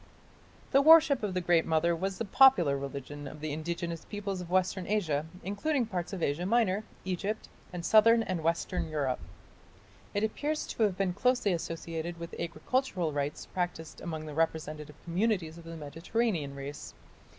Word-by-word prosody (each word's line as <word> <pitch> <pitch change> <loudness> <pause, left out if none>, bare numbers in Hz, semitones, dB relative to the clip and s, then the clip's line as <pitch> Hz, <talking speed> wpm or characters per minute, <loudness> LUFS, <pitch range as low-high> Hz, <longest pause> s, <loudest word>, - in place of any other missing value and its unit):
The 275 - +6
worship 310 -2 +7
of 200 -3 -2
the 185 - +1
Great 170 -2 +3
Mother 165 +1 +2
was 190 +3 -2
the 230 - -2
popular 195 - +6
religion 140 +1 -6
of 150 - -9
the 155 -1 -3
indigenous 170 +1 -3
peoples 200 -3 -4
of 175 - -8
western 185 0 +1
Asia, 160 -8 0 0.2
including 245 +7 0
parts 180 -6 -4
of 190 -4 -4
Asia 165 +6 0
Minor, 215 -2 +2 0.2
Egypt, 195 +4 -2 0.2
and 175 -2 -5
southern 230 +1 +6
and 185 -5 -2
western 165 +1 -1
Europe. 140 -5 -1 1.0
It 205 - +1
appears 295 +8 -1
to - - -5
have 200 -4 +3
been 190 -2 +1
closely 245 -1 +2
associated 165 0 -4
with 170 0 -7
agricultural 175 - -1
rites 145 0 -2
practised 175 -3 -4
among 160 -3 -5
representative 155 -1 -2
communities 175 -2 0
of 165 - -13
the 165 0 -7
Mediterranean 160 - -2
race. 140 +1 -7
175 Hz, 160 wpm, -30 LUFS, 160-205 Hz, 1.0 s, worship